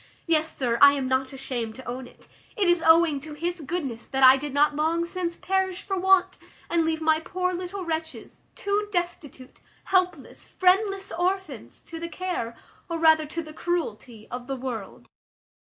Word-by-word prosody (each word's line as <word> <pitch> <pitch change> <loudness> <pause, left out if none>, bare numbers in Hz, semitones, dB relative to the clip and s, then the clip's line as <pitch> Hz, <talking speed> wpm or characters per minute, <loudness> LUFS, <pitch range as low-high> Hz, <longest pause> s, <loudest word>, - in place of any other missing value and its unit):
Yes, 315 -1 0
sir, 235 -3 0
I 280 0 +9
am 275 -2 -2
not 260 0 0
ashamed 250 -5 -4
to 260 - -11
own 250 +1 -5
it; - - -19 0.3
it 400 -3 +2
is 350 -1 +3
owing 320 -3 +5
to 300 +2 -9
his 345 +2 -3
goodness 275 -7 -4
that 270 0 -1
I 260 0 +10
did 290 +2 -4
not 290 +2 +3
long 325 +3 +1
since 345 -1 -3
perish 380 0 -1
for 390 - -2
want, 380 0 +3 0.3
and 340 -1 +3
leave 320 0 -1
my 315 0 +3
poor 365 +2 -2
little 365 +1 -5
wretches, 320 -1 -5
two 410 +1 -1
destitute, 345 -8 -4 0.2
helpless, 365 -1 -1
friendless 390 +1 +1
orphans, 355 - -3
to 330 - -8
the 335 0 -5
care, 340 -12 -4 0.3
or 335 - -2
rather 315 -1 +4
to 335 +3 -4
the 310 0 -11
cruelty, 245 -11 -4
of 250 0 -6
the 270 - -2
world. 245 -6 -6
320 Hz, 175 wpm, -25 LUFS, 270-360 Hz, 0.3 s, I